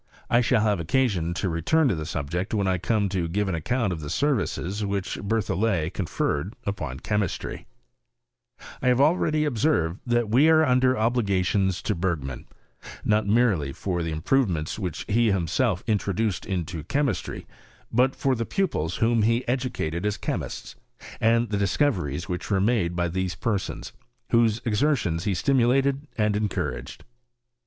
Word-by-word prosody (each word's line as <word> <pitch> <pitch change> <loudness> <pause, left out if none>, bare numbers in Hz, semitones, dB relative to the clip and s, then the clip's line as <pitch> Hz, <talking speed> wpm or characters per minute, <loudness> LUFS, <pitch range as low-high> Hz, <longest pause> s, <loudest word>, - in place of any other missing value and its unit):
I 120 - +5
shall 120 -2 +2
have 105 -3 +1
occasion 85 -3 0
to 95 - -1
return 90 - +2
to - - +2
the 80 -2 -4
subject 85 +7 -3
when 100 -2 +1
I 95 -1 +1
come 100 +4 +1
to 90 -3 -1
give 100 +4 -1
an 95 - -1
account 105 +5 0
of 80 - -5
the 75 -2 -6
services 105 - -1
which 100 -1 -2
Ber 110 +3 0
thollet 95 -4 0
conferred 85 -1 -2
upon 75 -10 -4
chemistry, 105 -4 -2 1.1
I - - 0
have 125 0 +4
already 155 0 +3
observed, 115 - +1
that 120 -1 +2
we 130 +9 +4
are 160 0 +5
under 130 -1 +3
oblit 120 0 +1
gallons 95 0 +1
to 105 - 0
Bergman, 80 -8 -3 0.6
not 105 0 +2
merely 100 - +2
for 90 +3 -3
the 80 - -2
improve 105 +10 +1
ments 80 +3 -3
which 90 -5 -4
be 115 +1 +2
himself 95 +2 0
introduced 105 -1 -1
into 85 -4 -3
chemistry, 140 - -1 0.5
but 125 +3 +3
for 135 - +1
the 115 -2 -1
pupils 115 - -1
whom 115 0 +2
he 115 +3 +1
educated 120 -10 -2
as 105 0 -1
chemists, - - -4 0.4
and 115 +1 +3
the 105 - -1
discoveries 95 - 0
which 90 -1 -4
were 100 -2 +2
made 100 -5 +1
by 85 0 0
those 90 +1 -2
per 105 -4 0
sons, - - -7 0.4
whose 115 -1 +3
exertions 110 - +1
he 100 -3 +1
stimulated 135 - +2
and 105 -1 +2
encou 105 -1 -1
raged. - - -9
105 Hz, 165 wpm, -25 LUFS, 90-120 Hz, 1.1 s, I